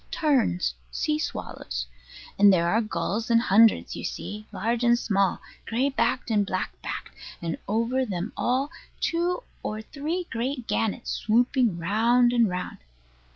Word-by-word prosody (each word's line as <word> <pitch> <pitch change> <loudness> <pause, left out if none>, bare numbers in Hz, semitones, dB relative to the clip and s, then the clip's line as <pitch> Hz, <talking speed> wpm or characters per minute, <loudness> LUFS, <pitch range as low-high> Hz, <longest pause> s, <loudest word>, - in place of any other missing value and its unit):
Terns 265 - +1 0.2
sea 305 -1 0
swallows. - - -4 0.5
And 200 0 +8
there 170 -2 +3
are 225 +5 +3
gulls 220 +1 -2
in 230 - +5
hundreds, 225 -1 +4
you - - -6
see, 215 +1 -5
large 230 +4 -1
and 240 0 +5
small, 200 -5 +1 0.3
gray 250 +5 +1
backed 260 -2 0
and 210 -2 +3
black 185 -1 -2
backed; - - -5 0.3
and 165 -1 -3
over 230 +5 +1
them 195 -3 -4
all 265 +5 0 0.3
two 350 +6 0 0.2
or 215 +1 -4
three 315 +8 -3
great 250 +2 -2
gannets 225 +2 -1
swooping 235 -2 +2
round 230 +7 +3
and 235 -3 +4
round. 180 0 -4
230 Hz, 145 wpm, -26 LUFS, 205-255 Hz, 0.5 s, And